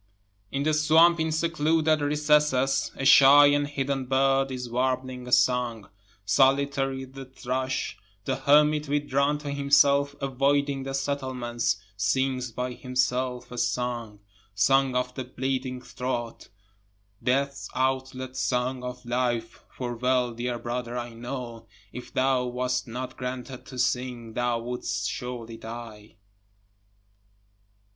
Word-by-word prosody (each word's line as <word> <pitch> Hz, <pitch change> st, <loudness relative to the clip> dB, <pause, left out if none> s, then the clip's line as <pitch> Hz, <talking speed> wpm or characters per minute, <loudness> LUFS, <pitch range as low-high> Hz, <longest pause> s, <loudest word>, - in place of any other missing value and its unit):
4 135 Hz, -, -4 dB
In 140 Hz, -, 0 dB
the 155 Hz, +1 st, +1 dB
swamp 160 Hz, +3 st, +5 dB
in 160 Hz, 0 st, 0 dB
secluded 160 Hz, -1 st, +1 dB
recesses, 150 Hz, -2 st, +2 dB
A 135 Hz, -, -4 dB
shy 140 Hz, +2 st, +8 dB
and 145 Hz, 0 st, +3 dB
hidden 135 Hz, -2 st, -2 dB
bird 135 Hz, +1 st, +2 dB
is 125 Hz, -2 st, -5 dB
warbling 130 Hz, +1 st, -2 dB
a -, -, -7 dB
song. 125 Hz, -4 st, +2 dB, 0.4 s
Solitary 135 Hz, +3 st, +2 dB
the 135 Hz, +1 st, -10 dB
thrush, 130 Hz, 0 st, -3 dB, 0.3 s
The 130 Hz, -, 0 dB
hermit 150 Hz, +2 st, +4 dB
withdrawn 145 Hz, 0 st, +1 dB
to 145 Hz, -1 st, -6 dB
himself, 140 Hz, 0 st, +3 dB
avoiding 140 Hz, +1 st, +1 dB
the 135 Hz, 0 st, -4 dB
settlements, 130 Hz, -5 st, -1 dB, 0.2 s
Sings 125 Hz, +4 st, 0 dB
by 125 Hz, +2 st, -3 dB
himself 125 Hz, 0 st, -1 dB
a 125 Hz, -, -5 dB
song. 120 Hz, -3 st, -2 dB, 0.3 s
Song 135 Hz, +5 st, +3 dB
of 125 Hz, 0 st, -1 dB
the 130 Hz, -, -4 dB
bleeding 130 Hz, 0 st, -3 dB
throat, 120 Hz, -2 st, -5 dB, 0.7 s
Death's 140 Hz, +2 st, -1 dB
outlet 130 Hz, 0 st, -2 dB
song 125 Hz, 0 st, -1 dB
of 125 Hz, 0 st, -7 dB
life, 120 Hz, -2 st, -2 dB
(for 120 Hz, -2 st, -5 dB
well 125 Hz, 0 st, +1 dB
dear 120 Hz, +1 st, -3 dB
brother 120 Hz, 0 st, -4 dB
I 120 Hz, -1 st, -5 dB
know, 120 Hz, -1 st, -7 dB, 0.3 s
If 125 Hz, -, -8 dB
thou 130 Hz, -1 st, +1 dB
wast 125 Hz, +1 st, -2 dB
not 125 Hz, +2 st, -6 dB
granted 125 Hz, 0 st, -6 dB
to 130 Hz, -, -9 dB
sing, 125 Hz, -2 st, -1 dB
thou 120 Hz, -1 st, 0 dB
would'st 105 Hz, -5 st, -3 dB
surely 120 Hz, -2 st, -5 dB
die.) 110 Hz, -2 st, -9 dB
130 Hz, 125 wpm, -26 LUFS, 125-140 Hz, 0.7 s, shy